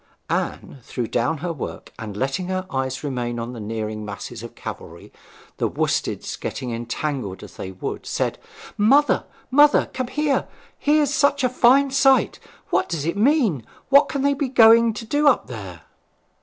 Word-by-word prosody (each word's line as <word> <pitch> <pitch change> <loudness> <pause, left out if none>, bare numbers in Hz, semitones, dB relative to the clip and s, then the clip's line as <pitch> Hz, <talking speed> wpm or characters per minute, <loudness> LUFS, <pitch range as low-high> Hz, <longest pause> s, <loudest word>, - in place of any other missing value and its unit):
Anne 140 - -3
threw 120 +1 -4
down 120 +8 0
her 170 - -1
work, 145 - -7
and 105 -2 -6
letting 135 - -2
her 185 0 -2
eyes 130 0 -2
remain 120 -4 -3
on 120 +1 -5
the 120 - -8
nearing 110 0 -4
masses 100 -1 -7
of - - -10
cavalry, - - -9 0.4
the - - +1
worsteds - - -2
getting 125 -3 -4
entangled 120 -2 -4
as - - -12
they 95 - -6
would, 95 - -6
said, - - -2 0.4
'Mother, 275 +8 +4 0.3
mother; 290 +2 +5
come 255 -1 -3
here! 295 +1 0 0.3
Here's 295 -1 +2
such 280 -1 +2
a 255 - +3
fine 260 +3 +4
sight! 270 -1 +3 0.3
What - - +1
does 165 -5 -3
it 170 - -1
mean? 220 - +2 0.3
What 280 +1 +6
can 275 0 -2
they 280 0 +3
be 280 -1 -2
going 230 -2 +6
to 230 +1 -7
do 290 +6 +1
up 270 - +4
there?' 95 -8 -9
185 Hz, 170 wpm, -22 LUFS, -, 0.4 s, What